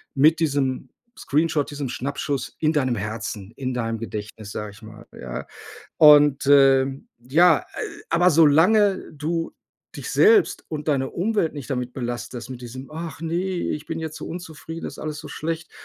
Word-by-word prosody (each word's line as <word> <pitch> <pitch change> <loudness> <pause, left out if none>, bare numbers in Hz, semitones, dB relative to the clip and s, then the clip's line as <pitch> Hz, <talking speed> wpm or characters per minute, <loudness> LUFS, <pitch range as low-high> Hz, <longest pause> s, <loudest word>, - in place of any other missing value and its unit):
mit 155 +4 +5
diesem 140 -5 0 0.3
Screenshot, 150 0 0
diesem 145 -2 -4
Schnappschuss 140 +2 -3
in 155 -1 +2
deinem 130 -5 +1
Herzen, 105 -1 -5
in 130 -1 -3
deinem 115 -2 -2
Gedächtnis, 105 -1 -7
sage 105 -1 -5
ich 100 +2 -17
mal, 110 0 -12
ja. 60 -1 -6 0.5
Und, 145 -2 +7
ähm, 135 -1 +4
ja, 160 +7 +4
äh, - - -16 0.5
aber 175 +2 +4
solange 180 +6 +4
du 165 +3 -3 0.4
dich - - -6
selbst 425 -1 +4
und 150 0 -5
deine 135 -3 +1
Umwelt 195 -2 0
nicht 145 -2 -8
damit 125 -2 -2
belastest 120 0 -5
mit 125 -2 -7
diesem: 130 +3 -9
„Ach, 160 -1 -7
ne, 165 0 -3
ich 180 -4 -2
bin 165 0 -4
jetzt 160 -1 -5
so - - -7
unzufrieden, 165 -1 -8
ist - - -8
alles 155 -1 -5
so - - -9
schlecht.“ 160 +1 -4
145 Hz, 165 wpm, -23 LUFS, 125-160 Hz, 0.5 s, Und